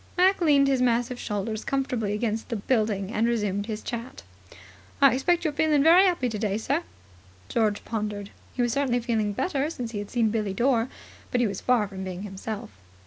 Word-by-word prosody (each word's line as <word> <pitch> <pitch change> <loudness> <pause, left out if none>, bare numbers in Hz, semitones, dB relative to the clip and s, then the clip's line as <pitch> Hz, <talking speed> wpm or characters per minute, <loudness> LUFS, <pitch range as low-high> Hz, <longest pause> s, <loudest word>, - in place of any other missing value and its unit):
Mac 370 +1 +4
leaned 285 -4 +5
his 265 -2 +2
massive 245 0 +1
shoulders 210 +1 -3
comfortably 250 -6 -1
against 220 +2 -2
the 235 - -2
building, 210 -3 0
and 230 +1 +1
resumed 205 -3 -1
his 215 -1 -4
chat. 235 +2 -6 0.8
"I - - +6
expect 345 +7 +1
you're 310 -3 0
feeling 300 -1 +3
very 350 +5 +7
'appy 340 -9 +1
today, 210 -3 -1
sir?" 280 +8 0 0.7
George 215 -3 0
pondered. 210 -2 -4 0.2
He 245 - +1
was 240 -1 0
certainly 265 -3 +1
feeling 225 -3 0
better 285 - -1
since 245 -7 -5
he 210 - -4
had 205 - -6
seen 230 -3 +1
Billie 210 -3 -1
Dore, 240 +1 +2 0.4
but 250 - 0
he 245 - +3
was 200 -3 -3
far 240 -5 +2
from 190 -1 -7
being 185 0 -5
himself. 205 - -6
230 Hz, 190 wpm, -26 LUFS, 210-265 Hz, 0.8 s, very